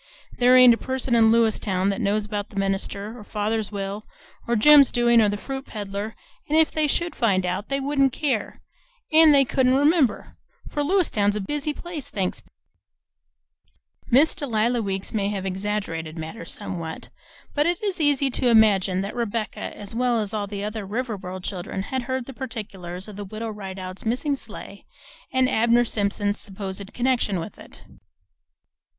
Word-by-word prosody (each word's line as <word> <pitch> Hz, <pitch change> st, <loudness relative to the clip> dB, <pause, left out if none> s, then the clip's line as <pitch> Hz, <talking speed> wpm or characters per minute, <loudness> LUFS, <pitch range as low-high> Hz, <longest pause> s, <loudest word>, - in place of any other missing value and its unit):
There 250 Hz, +1 st, +5 dB
ain't 250 Hz, -2 st, +9 dB
a -, -, -1 dB
person 260 Hz, 0 st, -2 dB
in 225 Hz, -1 st, +5 dB
Lewiston 210 Hz, -4 st, +2 dB
that 200 Hz, +4 st, -2 dB
knows 210 Hz, 0 st, +1 dB
about 205 Hz, -1 st, -4 dB
the -, -, -15 dB
minister, 200 Hz, +2 st, -2 dB
or 230 Hz, -, -10 dB
father's 215 Hz, +1 st, -2 dB
will, 200 Hz, +1 st, -5 dB, 0.4 s
or 235 Hz, -, +1 dB
Jim's 285 Hz, +5 st, +7 dB
doin's, 240 Hz, -1 st, +4 dB
or 210 Hz, -, +3 dB
the 205 Hz, -, -2 dB
fruit 270 Hz, +5 st, -6 dB
peddler; 205 Hz, +1 st, -5 dB, 0.3 s
an' 305 Hz, -, +1 dB
if 320 Hz, 0 st, +4 dB
they 310 Hz, -1 st, +1 dB
should 340 Hz, +3 st, 0 dB
find 195 Hz, -6 st, +2 dB
out, 185 Hz, +4 st, -3 dB
they 275 Hz, 0 st, 0 dB
wouldn't 275 Hz, -1 st, +2 dB
care, 255 Hz, -6 st, -2 dB, 0.5 s
an' 315 Hz, 0 st, +8 dB
they 275 Hz, -2 st, +5 dB
couldn't 255 Hz, 0 st, +2 dB
remember; 285 Hz, -, +2 dB, 0.3 s
for 295 Hz, -, -3 dB
Lewiston 290 Hz, -, +2 dB
's -, -, -6 dB
a -, -, -1 dB
busy 295 Hz, +9 st, -2 dB
place, 315 Hz, -2 st, -6 dB
thanks 190 Hz, -3 st, -2 dB
be!" -, -, -29 dB, 1.6 s
Miss 280 Hz, +6 st, +5 dB
Delia 235 Hz, -3 st, 0 dB
Weeks 195 Hz, -2 st, -4 dB
may 200 Hz, -2 st, 0 dB
have 195 Hz, -2 st, -3 dB
exaggerated 190 Hz, -5 st, -3 dB
matters 160 Hz, +9 st, -6 dB
somewhat, 170 Hz, -6 st, -6 dB, 0.4 s
but 295 Hz, +1 st, +2 dB
it 345 Hz, +3 st, -1 dB
is 390 Hz, -5 st, -1 dB
easy 285 Hz, -2 st, +2 dB
to 250 Hz, +1 st, 0 dB
imagine 200 Hz, -5 st, +4 dB
that 200 Hz, +4 st, -5 dB
Rebecca 230 Hz, -2 st, -3 dB
as 205 Hz, +1 st, -9 dB
well 240 Hz, 0 st, +1 dB
as 210 Hz, -1 st, -3 dB
all 205 Hz, -2 st, -2 dB
the 200 Hz, 0 st, -5 dB
other 215 Hz, 0 st, -4 dB
Riverboro 195 Hz, -4 st, -4 dB
children 190 Hz, 0 st, -4 dB
had 260 Hz, +5 st, -3 dB
heard 260 Hz, 0 st, -3 dB
the 270 Hz, -, -9 dB
particulars 200 Hz, -8 st, -7 dB
of 210 Hz, -2 st, -10 dB
the 205 Hz, -, -5 dB
Widow 220 Hz, +3 st, -5 dB
Rideout's 190 Hz, -2 st, -7 dB
missing 255 Hz, +6 st, 0 dB
sleigh -, -, -10 dB, 0.4 s
and 260 Hz, 0 st, +3 dB
Abner 235 Hz, +1 st, +3 dB
Simpson's 205 Hz, -1 st, -1 dB
supposed 195 Hz, 0 st, -5 dB
connection 240 Hz, -6 st, 0 dB
with 170 Hz, +5 st, -8 dB
it. -, -, -14 dB
220 Hz, 170 wpm, -24 LUFS, 200-260 Hz, 1.6 s, ain't